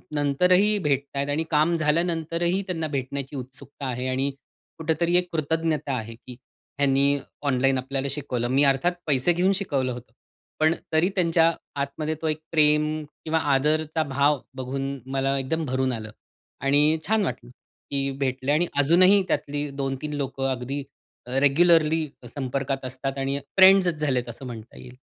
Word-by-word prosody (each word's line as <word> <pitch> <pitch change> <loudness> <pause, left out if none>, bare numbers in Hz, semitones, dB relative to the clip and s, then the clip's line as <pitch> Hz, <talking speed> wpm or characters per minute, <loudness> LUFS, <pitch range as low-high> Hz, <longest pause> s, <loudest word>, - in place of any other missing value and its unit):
नंतरही 180 +9 +3
भेटतायेत 140 -2 -1
आणि 155 +3 0
काम 155 +3 +3
झाल्यानंतरही 170 +3 0
त्यांना 165 -3 -2
भेटण्याची 135 +2 -5
उत्सुकता 135 +2 -7
आहे. 125 +1 -3
आणि 135 +2 0 0.5
कुठेतरी 165 +2 0
एक 180 0 +1
कृतज्ञता 155 -2 -1
आहे 115 0 -6
की 125 +1 -10 0.4
ह्यांनी 140 0 +3 0.2
ऑनलाईन 135 -1 +2
आपल्याला 135 +1 -2
शिकवलं. 130 -4 -3
मी 135 +2 +3
अर्थात 135 +5 +3 0.2
पैसे 140 +3 +3
घेऊन 185 +3 +2
शिकवलं 140 -10 -1
होतं. 120 -2 -11 0.5
पण 155 +1 +4 0.2
तरी 165 +4 +3
त्यांच्या 165 -2 +3 0.3
आतमध्ये 150 +3 -3
तो 160 - -1
एक 155 0 -1
प्रेम 150 -1 +4 0.4
किंवा 160 0 +1
आदरचा 155 +3 +1
भाव 140 0 +1 0.2
बघून 135 +1 -4
मला 135 0 +1
एकदम 160 +4 -1
भरून 130 0 0
आलं. 110 -1 -6 0.5
आणि 145 +3 +3
छान 220 0 +2
वाटलं, 125 -3 -5 0.4
की 140 -1 0
भेटले 130 0 -1
आणि 170 +3 +2
अजूनही 185 +7 +6
त्यातली 145 -2 -2
2-3 140 +1 -4
लोकं 135 -2 -2
अगदी 130 +3 -3 0.4
अ, 125 - -9
रेग्युलरली 160 +2 +4 0.3
संपर्कात 135 0 -3
असतात, 135 +2 -4
आणि 135 +1 -1 0.2
फ्रेंड्सच 190 -3 +6
झालेत 125 -5 0
असं 130 +3 -9
म्हणता 115 -2 -9
येईल. 125 0 -12
140 Hz, 145 wpm, -25 LUFS, 135-160 Hz, 0.5 s, अजूनही